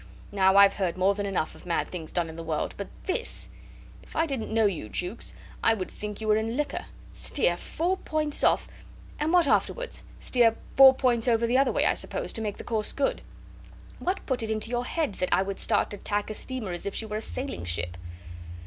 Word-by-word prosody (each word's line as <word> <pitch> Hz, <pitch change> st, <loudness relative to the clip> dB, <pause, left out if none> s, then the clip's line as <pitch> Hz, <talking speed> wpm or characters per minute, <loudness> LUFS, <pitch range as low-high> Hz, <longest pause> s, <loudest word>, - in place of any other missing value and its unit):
Now, 190 Hz, -1 st, +4 dB
I've 200 Hz, 0 st, +8 dB
heard 185 Hz, -3 st, -1 dB
more 190 Hz, +2 st, +4 dB
than 200 Hz, 0 st, -3 dB
enough 190 Hz, -5 st, -1 dB
of -, -, -15 dB
mad 170 Hz, -, 0 dB
things 165 Hz, -4 st, -6 dB
done 175 Hz, -2 st, 0 dB
in 160 Hz, -, -8 dB
the 165 Hz, -, -6 dB
world 160 Hz, -2 st, -2 dB
but 200 Hz, -, -5 dB, 0.2 s
this.... 370 Hz, -, -2 dB, 0.5 s
If -, -, -16 dB
I 325 Hz, -, +3 dB
didn't 270 Hz, -7 st, -3 dB
know 220 Hz, 0 st, +3 dB
you, 175 Hz, -, -1 dB
Jukes, 180 Hz, -, -4 dB, 0.3 s
I 225 Hz, -, +5 dB
would 185 Hz, -4 st, -5 dB
think 210 Hz, -1 st, -6 dB
you 220 Hz, -, -4 dB
were 215 Hz, 0 st, +5 dB
in 225 Hz, +3 st, -1 dB
liquor. 295 Hz, 0 st, -2 dB, 0.3 s
Steer 175 Hz, -11 st, +1 dB
four 345 Hz, -, -1 dB
points 305 Hz, -4 st, -2 dB
off.... -, -, +3 dB, 0.5 s
And 305 Hz, +2 st, +1 dB
what 350 Hz, -3 st, +5 dB
afterwards? -, -, 0 dB, 0.2 s
Steer 235 Hz, -3 st, +3 dB, 0.2 s
four 265 Hz, -1 st, +9 dB
points 245 Hz, -2 st, +1 dB
over 235 Hz, -1 st, +3 dB
the 245 Hz, +3 st, +3 dB
other 275 Hz, -, +3 dB
way, -, -, +1 dB
I -, -, +4 dB
suppose, -, -, -3 dB
to 225 Hz, -, -3 dB
make 210 Hz, -2 st, -3 dB
the -, -, -7 dB
course 220 Hz, -2 st, -2 dB
good. 280 Hz, -, 0 dB, 0.8 s
What 375 Hz, +2 st, -2 dB
put 260 Hz, -3 st, -1 dB
it 225 Hz, -, -3 dB
into 220 Hz, +1 st, -2 dB
your 245 Hz, 0 st, 0 dB
head 310 Hz, -5 st, -1 dB
that 185 Hz, -, +1 dB
I 190 Hz, -, +4 dB
would 195 Hz, 0 st, -5 dB
start 215 Hz, -, +1 dB
to 205 Hz, -, -4 dB
tack 205 Hz, +2 st, -2 dB
a -, -, -3 dB
steamer 240 Hz, -3 st, -5 dB
as 175 Hz, +2 st, -5 dB
if 200 Hz, -, -4 dB
she 225 Hz, -, -2 dB
were 215 Hz, 0 st, -3 dB
a -, -, -4 dB
sailing 260 Hz, -, -4 dB
ship?" 85 Hz, 0 st, -1 dB
220 Hz, 225 wpm, -27 LUFS, 195-260 Hz, 0.8 s, four